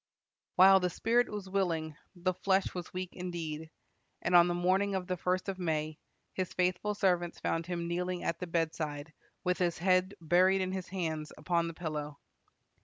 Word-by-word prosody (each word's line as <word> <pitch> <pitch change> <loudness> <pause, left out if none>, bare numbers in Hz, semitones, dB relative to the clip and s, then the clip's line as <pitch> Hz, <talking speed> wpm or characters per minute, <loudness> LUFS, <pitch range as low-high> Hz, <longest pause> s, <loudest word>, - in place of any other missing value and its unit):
While 190 +1 +8
the 180 -1 0
spirit 235 +7 +2
was 205 -2 -5
willing, 170 -5 -1 0.2
the 185 +1 0
flesh 190 +1 +1
was 175 -2 -6
weak 185 0 -4
indeed, 165 -3 -5 0.5
and 170 - 0
on 175 0 +8
the 175 - 0
morning 190 +3 +2
of 185 -1 -2
the 185 0 -1
first 180 +2 -1
of 195 -1 -3
May, 155 -3 -2 0.3
his 185 -2 -2
faithful 185 +3 0
servants 180 -4 +1
found 165 0 -1
him 170 -1 -3
kneeling 180 +1 -2
at 170 0 -1
the 180 - -4
bedside, 160 -2 -2 0.3
with 180 0 0
his 175 -2 +1
head 185 +2 +2
buried 185 +4 +4
in 185 0 -1
his 185 -1 -4
hands 160 -5 -3
upon 170 +2 0
the 165 - -6
pillow. 150 -3 -4
180 Hz, 180 wpm, -31 LUFS, 165-185 Hz, 0.5 s, While